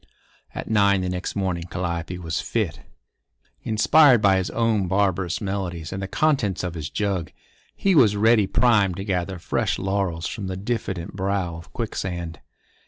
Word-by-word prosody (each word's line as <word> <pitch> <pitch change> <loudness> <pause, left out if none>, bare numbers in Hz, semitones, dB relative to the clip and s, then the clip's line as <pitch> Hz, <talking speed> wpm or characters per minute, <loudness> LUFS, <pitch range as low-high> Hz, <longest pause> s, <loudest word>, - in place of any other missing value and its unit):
At - - -5
nine 100 -3 +3
the 90 - -2
next 90 0 -4
morning 90 -4 -1
Calliope 85 -1 -3
was 80 -3 -3
fit. - - -2 0.8
Inspired 125 +4 +5
by 95 -2 +4
his 95 - -1
own 115 -5 +1
barbarous 95 -2 0
melodies 95 -5 -4
and 95 - -4
the 95 - -3
contents 135 -7 +1
of 90 -2 -3
his 80 -3 -5
jug, 100 -5 -2 0.4
he 195 - +2
was 115 - +5
ready 110 -1 +4
primed 105 -7 +3
to 95 - -4
gather 95 -2 -2
fresh 85 - -1
laurels 95 -4 -1
from 105 -4 -4
the 95 0 -4
diffident 95 -5 -3
brow 95 -3 -1
of 80 0 -12
Quicksand. 90 -7 -4
95 Hz, 160 wpm, -23 LUFS, 90-105 Hz, 0.8 s, Inspired